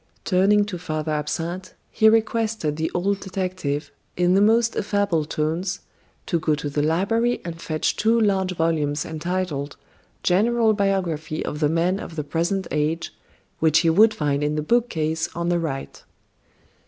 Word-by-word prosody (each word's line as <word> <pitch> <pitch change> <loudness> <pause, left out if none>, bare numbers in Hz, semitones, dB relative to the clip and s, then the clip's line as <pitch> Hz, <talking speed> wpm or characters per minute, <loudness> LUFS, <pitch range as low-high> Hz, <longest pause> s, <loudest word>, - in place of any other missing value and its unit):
Turning 205 +2 +3
to 190 -4 -6
Father 155 -2 -3
Absinthe, 165 +5 -3 0.2
he 220 -1 +5
requested 220 -7 +1
the 160 +1 -1
old 195 +3 0
detective, 185 -7 -3 0.3
in 180 0 +3
the 195 - +4
most 225 +2 +3
affable 200 -6 0
tones, 165 +5 -2 0.4
to 170 - 0
go 155 -1 +1
to 145 -1 -5
the 145 +1 0
library 210 +10 +1
and 170 -1 -6
fetch 155 -2 -1
two 225 +2 +2
large 195 -4 +1
volumes 155 -3 0
entitled: 160 -3 -3 0.5
"General 220 +4 +3
Biography 185 -7 -1
of 150 - -4
the 150 -2 +2
Men 170 +4 +1
of 165 - -8
the 150 - -2
Present 170 +6 -1
Age," 155 +2 -1 0.5
which 160 -1 +4
he 165 -1 +3
would 215 +6 +6
find 145 -3 0
in 150 +1 0
the 150 - -1
bookcase 160 -7 0
on 170 +1 -1
the 175 0 +2
right. 140 -5 -5
170 Hz, 155 wpm, -23 LUFS, 155-200 Hz, 0.5 s, would